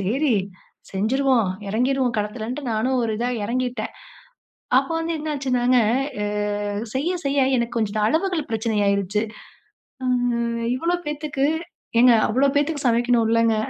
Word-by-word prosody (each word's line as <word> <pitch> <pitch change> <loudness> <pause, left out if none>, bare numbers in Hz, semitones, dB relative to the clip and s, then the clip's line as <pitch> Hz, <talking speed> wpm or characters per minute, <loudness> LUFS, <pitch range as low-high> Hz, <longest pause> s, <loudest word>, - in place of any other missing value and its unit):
சேரி, 245 +7 +1 0.6
செஞ்சுருவோம், 235 +2 +2 0.2
இறங்கிருவோம் 250 +3 +1
களத்துலன்ட்டு 230 +6 -4
நானும் 250 +4 +1
ஒரு 225 -2 -1
இதா 245 +1 0
இறங்கிட்டேன். 245 0 -2 0.9
அப்போ - - -5
வந்து 330 +1 -2
என்னாச்சுன்னாங்க 265 -5 0 0.5
அ 205 0 -2
செய்ய, 295 +7 0
செய்ய 280 0 +1 0.2
எனக்கு 235 0 -2
கொஞ்சம் 220 -2 -1
இந்த 215 - +1
அளவுகள் 325 -1 0
பிரச்சனை 220 0 -1
ஆயிருச்சு. 200 +1 +1 0.8
ஆ, - - -1 0.2
ம், 235 -1 -1
இவ்வளோ 340 +6 0
பேத்துக்கு 295 -2 -1 0.5
ஏங்க 245 0 +7 0.2
அவ்வளோ 270 +5 +3
பேத்துக்கு 290 -1 0
சமைக்கணும் 235 0 +2
இல்லங்க? 230 -1 +3
240 Hz, 125 wpm, -23 LUFS, 220-275 Hz, 0.9 s, ஏங்க